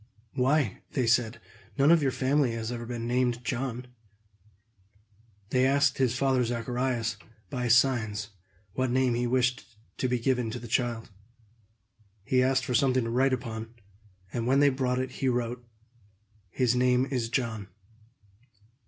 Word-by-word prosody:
"Why," 130 Hz, -4 st, +1 dB
they 130 Hz, -4 st, +1 dB
said, 115 Hz, 0 st, +1 dB, 0.4 s
"none 140 Hz, +3 st, +5 dB
of 170 Hz, -2 st, +5 dB
your 140 Hz, -, +2 dB
family 135 Hz, -1 st, +1 dB
have 115 Hz, 0 st, -4 dB
ever 120 Hz, -1 st, -5 dB
been 120 Hz, -1 st, -4 dB
named 120 Hz, 0 st, 0 dB
John!" 125 Hz, 0 st, -3 dB, 1.7 s
They 130 Hz, 0 st, +3 dB
asked 140 Hz, +1 st, +2 dB
his 125 Hz, -2 st, +1 dB
father 135 Hz, -2 st, +2 dB
Zacharias, 120 Hz, -1 st, -2 dB, 0.3 s
by 125 Hz, -3 st, -2 dB
signs, 115 Hz, -4 st, +2 dB, 0.4 s
what 130 Hz, +2 st, 0 dB
name 130 Hz, 0 st, +2 dB
he 120 Hz, +1 st, 0 dB
wished 125 Hz, -2 st, -1 dB, 0.2 s
to 130 Hz, -, 0 dB
be 125 Hz, -, +1 dB
given 125 Hz, -1 st, 0 dB
to 120 Hz, +3 st, -5 dB
the 120 Hz, -, -9 dB
child. 115 Hz, -1 st, -1 dB, 1.1 s
He 125 Hz, +4 st, +2 dB
asked 130 Hz, 0 st, +2 dB
for 125 Hz, -, -2 dB
something 130 Hz, +1 st, +3 dB
to 115 Hz, -, -3 dB
write 130 Hz, +3 st, +2 dB
upon; 115 Hz, -2 st, -4 dB, 0.6 s
and 120 Hz, -1 st, -2 dB
when 135 Hz, +2 st, +4 dB
they 145 Hz, 0 st, +6 dB
brought 130 Hz, -1 st, -1 dB
it, 130 Hz, 0 st, -2 dB
he 135 Hz, -, -1 dB
wrote, 120 Hz, 0 st, -2 dB, 0.9 s
"His 125 Hz, +3 st, +1 dB
name 125 Hz, +1 st, +3 dB
is 120 Hz, -4 st, -1 dB
John." 115 Hz, -5 st, -2 dB
125 Hz, 150 wpm, -28 LUFS, 115-130 Hz, 1.7 s, they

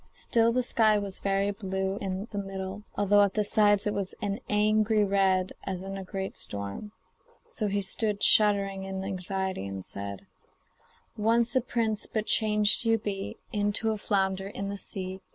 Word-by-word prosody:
Still 230 Hz, -1 st, +2 dB
the 250 Hz, +1 st, +1 dB
sky 220 Hz, -3 st, +4 dB
was 200 Hz, -2 st, -3 dB
very 195 Hz, 0 st, +1 dB
blue 190 Hz, -1 st, -3 dB
in 195 Hz, +1 st, -4 dB
the 205 Hz, -, -3 dB
middle, 195 Hz, 0 st, -5 dB
although 205 Hz, 0 st, +4 dB
at 200 Hz, -1 st, +2 dB
the 210 Hz, -, +2 dB
sides 205 Hz, -1 st, +3 dB
it 210 Hz, -, 0 dB
was 195 Hz, -2 st, -3 dB
an 205 Hz, 0 st, -2 dB
angry 215 Hz, +1 st, +3 dB
red 190 Hz, -2 st, +2 dB
as 190 Hz, -1 st, -4 dB
in 195 Hz, 0 st, -5 dB
a 195 Hz, -, -5 dB
great 190 Hz, 0 st, -5 dB
storm. 100 Hz, -, -3 dB, 0.6 s
So 215 Hz, -, -1 dB
he 200 Hz, 0 st, 0 dB
stood 205 Hz, +1 st, -1 dB
shuddering 200 Hz, -2 st, +4 dB
in 190 Hz, 0 st, -4 dB
anxiety, 190 Hz, -, -3 dB
and 95 Hz, -1 st, -6 dB
said: 100 Hz, -1 st, -6 dB, 0.9 s
'Once 230 Hz, +3 st, +2 dB
a 260 Hz, -, +4 dB
prince, 225 Hz, -3 st, -1 dB
but 215 Hz, -1 st, -2 dB
changed 210 Hz, -1 st, +3 dB
you 225 Hz, -1 st, +3 dB
be 200 Hz, -2 st, -4 dB, 0.2 s
Into 205 Hz, +1 st, +1 dB
a 215 Hz, -, -2 dB
flounder 190 Hz, -1 st, 0 dB
in 200 Hz, 0 st, -5 dB
the 200 Hz, -, -3 dB
sea. 190 Hz, 0 st, -6 dB
200 Hz, 170 wpm, -28 LUFS, 190-210 Hz, 0.9 s, sky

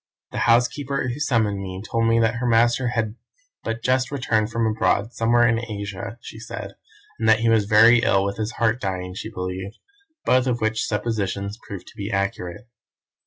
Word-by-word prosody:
The -, -, -3 dB
housekeeper 130 Hz, +3 st, +2 dB
who 125 Hz, +4 st, -4 dB
summoned 110 Hz, -8 st, +1 dB
me 95 Hz, -1 st, -6 dB
told 115 Hz, +2 st, -1 dB
me 115 Hz, 0 st, +3 dB
that 115 Hz, +1 st, +1 dB
her 125 Hz, +1 st, -1 dB
master 120 Hz, +2 st, +3 dB
had 115 Hz, -2 st, -2 dB, 0.5 s
but 115 Hz, +1 st, -4 dB
just 130 Hz, 0 st, +2 dB
returned 110 Hz, -6 st, 0 dB
from 115 Hz, -1 st, 0 dB
abroad, 110 Hz, +1 st, +1 dB
somewhere 120 Hz, +1 st, +3 dB
in 115 Hz, 0 st, +1 dB
Asia, 105 Hz, +1 st, -6 dB
she 110 Hz, -, -10 dB
said, 115 Hz, -, -7 dB, 0.5 s
and 110 Hz, 0 st, +2 dB
that 110 Hz, 0 st, +5 dB
he 115 Hz, -, +3 dB
was 110 Hz, -2 st, +3 dB
very 115 Hz, +3 st, +6 dB
ill 100 Hz, -4 st, +2 dB
with 100 Hz, -, -3 dB
his 110 Hz, +1 st, -3 dB
heart 115 Hz, +1 st, +1 dB
dying, 90 Hz, -1 st, -3 dB
she 105 Hz, +3 st, -6 dB
believed; 95 Hz, +1 st, -5 dB, 0.5 s
both 130 Hz, 0 st, +3 dB
of 120 Hz, -2 st, 0 dB
which 110 Hz, 0 st, 0 dB
suppositions 105 Hz, -1 st, -2 dB
proved 95 Hz, -3 st, -8 dB
to -, -, -15 dB
be 100 Hz, 0 st, -4 dB
accurate. 100 Hz, +1 st, -3 dB
110 Hz, 185 wpm, -23 LUFS, 100-120 Hz, 0.5 s, very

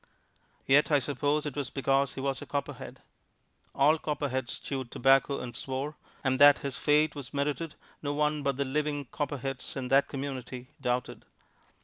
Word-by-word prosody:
Yet 140 Hz, +2 st, +5 dB
I 150 Hz, -, +5 dB
suppose 145 Hz, +2 st, 0 dB
it 145 Hz, -, -4 dB
was 145 Hz, -3 st, -2 dB
because 135 Hz, 0 st, +1 dB
he 135 Hz, -, -4 dB
was 135 Hz, -1 st, -1 dB
a -, -, -8 dB
Copperhead: 140 Hz, -1 st, -5 dB, 0.7 s
all 150 Hz, +3 st, +4 dB
Copperheads 135 Hz, -5 st, -2 dB
chewed 130 Hz, -3 st, -5 dB
tobacco 135 Hz, +3 st, +3 dB
and 120 Hz, -2 st, -6 dB
swore, 135 Hz, +3 st, -3 dB, 0.3 s
and 130 Hz, -1 st, +1 dB
that 145 Hz, 0 st, +9 dB
his 135 Hz, -2 st, -2 dB
fate 150 Hz, +4 st, +3 dB
was 140 Hz, -1 st, -8 dB
merited 150 Hz, +3 st, -1 dB, 0.3 s
no 145 Hz, -, -2 dB
one 150 Hz, +1 st, +1 dB
but 140 Hz, -2 st, 0 dB
the 140 Hz, -, 0 dB
living 145 Hz, +1 st, -1 dB
Copperheads 135 Hz, -2 st, -4 dB
in 130 Hz, -2 st, -4 dB
that 135 Hz, +1 st, +4 dB
community 130 Hz, -2 st, -6 dB
doubted. 125 Hz, -1 st, -2 dB
140 Hz, 160 wpm, -29 LUFS, 130-145 Hz, 0.7 s, that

